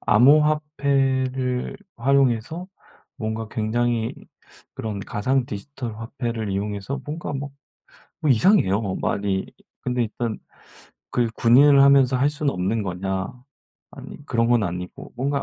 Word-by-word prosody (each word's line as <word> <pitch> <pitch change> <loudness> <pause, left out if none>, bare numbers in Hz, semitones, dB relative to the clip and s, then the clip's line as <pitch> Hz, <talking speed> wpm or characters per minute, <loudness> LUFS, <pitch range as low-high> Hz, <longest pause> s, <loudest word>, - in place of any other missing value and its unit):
암호화폐를 135 -2 +2 0.2
활용해서 135 +5 +1 0.5
뭔가 110 0 -4
굉장히 115 +1 -1 0.6
그런 105 -3 -4
가상 125 +6 0
디지털 115 +1 -6
화폐를 115 -2 -4
이용해서 100 +6 -3
뭔가 155 +2 -5
막 145 0 -4 0.7
뭐 155 - +1
이상해요 115 - +4
뭐 95 -4 -3
말이. 100 -1 -1 0.3
근데 125 -1 0
일단 115 0 -3 0.7
그 120 -2 +1
"군인을 135 +4 +6
하면서 140 -2 +5
할 135 +3 +2
수는 150 -1 -1
없는 95 +5 -1
거냐." 95 0 -3 0.6
아니 - - -11
그런 115 -4 +1
건 120 -2 +3
아니고 90 0 -6
뭔가 140 +3 -1
120 Hz, 260 characters per minute, -23 LUFS, 110-140 Hz, 0.7 s, 군인을